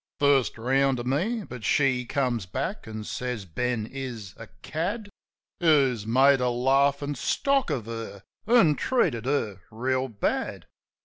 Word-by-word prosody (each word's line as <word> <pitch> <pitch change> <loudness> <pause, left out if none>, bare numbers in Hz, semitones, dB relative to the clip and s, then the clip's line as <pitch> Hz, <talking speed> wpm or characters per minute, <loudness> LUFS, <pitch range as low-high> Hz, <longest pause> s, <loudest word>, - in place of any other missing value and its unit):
First 140 -4 +3
round 135 +3 +2
to 120 - -4
me. 185 - -1
But 125 - -9
she 130 -1 +2
comes 120 -6 -1
back, 135 - -4
an' 110 -1 -6
says 125 -2 -4
Ben 120 +5 -2
is 120 -6 -7
a - - -10 0.2
cad 200 +7 -3 0.5
Who's 135 -10 +3
made 135 +4 +5
a 125 - +2
laughin' 140 +3 +2
stock 275 - +1
of 130 -8 -2
her, 115 -3 -7 0.2
an' 210 -11 +5
treated 160 - +1
her 110 -9 -1
reel 130 +4 -1
bad. 110 -5 -2
130 Hz, 140 wpm, -26 LUFS, 115-145 Hz, 0.5 s, made